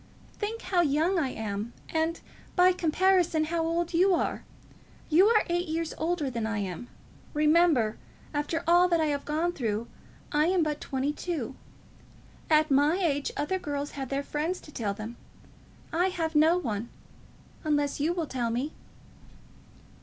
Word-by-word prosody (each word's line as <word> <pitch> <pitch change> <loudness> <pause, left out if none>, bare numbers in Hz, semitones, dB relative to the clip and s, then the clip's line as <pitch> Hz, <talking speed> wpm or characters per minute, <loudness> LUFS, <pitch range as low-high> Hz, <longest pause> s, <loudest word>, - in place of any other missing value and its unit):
"Think 445 +2 -3
how 365 -1 +2
young 330 +4 +2
I 275 -5 0
am, 215 0 -4
and, 320 +1 -1 0.4
by 360 0 +6
comparison, 355 -1 +2
how 325 +1 -1
old 335 +1 -1
you 365 +2 +4
are. - - -2 0.7
You 360 +6 +6
are 440 -1 +4
eight 350 0 0
years 325 0 -2
older 325 -2 -1
than 230 -4 -2
I 225 -1 -2
am. 200 +3 -4 0.5
Remember; 300 -7 +3 0.3
after 300 +3 -1
all 350 +2 +5
that 340 -2 +2
I 320 - +2
have 285 - -4
gone 325 +4 0
through, 225 -5 -2 0.5
I 300 +2 +3
am 365 -1 +3
but 300 -1 -2
twenty 270 +2 -1
two. 300 -8 -4 1.0
At 310 -1 +4
my 290 +5 +4
age 290 -7 0
other 375 +6 -1
girls 290 -3 -3
have 270 -2 -5
their 275 +1 -1
friends 315 +6 -2
to 300 - -13
tell 210 -7 -2
them. 220 +3 -7 0.8
I 350 +3 +3
have 330 -4 -2
no 320 +3 +5
one, 230 - -3 0.7
unless 290 -2 0
you 305 +4 +1
will 345 -2 -1
tell 250 -5 -2
me." 250 +6 -2
310 Hz, 160 wpm, -28 LUFS, 275-345 Hz, 1.0 s, by